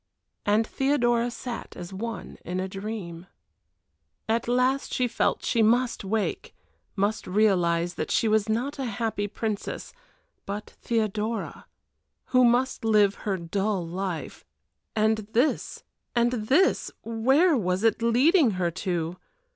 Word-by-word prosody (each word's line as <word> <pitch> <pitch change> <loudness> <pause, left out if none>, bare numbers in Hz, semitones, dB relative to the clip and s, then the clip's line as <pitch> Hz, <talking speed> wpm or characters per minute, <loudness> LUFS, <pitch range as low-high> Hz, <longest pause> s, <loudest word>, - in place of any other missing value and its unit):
And 210 +2 +3
Theodora 240 -3 +1
sat 240 0 -7
as 175 +1 -8
one 225 +4 -6
in 180 +1 -3
a 190 - -2
dream. 190 -3 -6 1.0
At 230 +1 0
last 255 +3 +1
she 250 - +1
felt 230 - 0
she 230 - +2
must 235 +2 +2
wake 210 +2 -2 0.4
must 205 +2 -1
realize 175 -4 +2
that - - -4
she 225 - +2
was 215 0 +2
not 255 +7 -1
a 265 - -1
happy 220 -2 -2
princess, 215 0 -4 0.5
but 205 +2 -5
Theodora, 220 0 -2 0.7
who 255 0 +6
must 245 +1 +2
live 210 -3 +4 0.2
her 195 - +1
dull 190 +2 -1
life 180 0 -4 0.5
and 220 0 +2
this 250 +7 0 0.3
and 240 0 +3
this 265 - +2
where 265 +10 +3
was 185 -4 0
it 225 0 +2
leading 255 - +4
her 175 -2 0
to? 175 -1 -3
220 Hz, 130 wpm, -26 LUFS, 195-240 Hz, 1.0 s, who